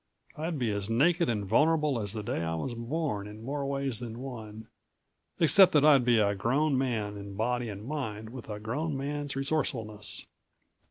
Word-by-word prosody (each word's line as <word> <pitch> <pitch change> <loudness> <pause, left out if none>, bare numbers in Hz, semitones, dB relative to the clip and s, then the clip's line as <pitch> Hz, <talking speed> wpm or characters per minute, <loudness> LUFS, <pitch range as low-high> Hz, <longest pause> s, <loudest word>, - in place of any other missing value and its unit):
I'd 160 +1 -3
be 120 -5 0
as 100 0 -3
naked 165 +9 +3
and 105 -3 -1
vulnerable 150 +3 +3
as 100 -2 -3
the 110 -2 -4
day 100 - -2
I 80 0 -1
was 120 +10 -3
born 115 -3 -2
in 105 +1 -10
more 140 +3 -3
ways 135 -4 0
than 115 -2 -6
one 110 -4 -8 0.7
except 175 +4 +6
that 150 -1 +5
I'd 140 -4 +7
be 120 -1 +4
a 100 -2 +3
grown 135 +9 +1
man 115 -6 -1
in 100 -1 -8
body 120 +2 -1
and 100 +1 -7
mind 110 -7 -4
with 125 -3 -9
a 105 -1 -4
grown 140 +8 -2
man's 145 0 -3
resourcefulness. 125 -7 -2
120 Hz, 180 wpm, -29 LUFS, 105-145 Hz, 0.7 s, I'd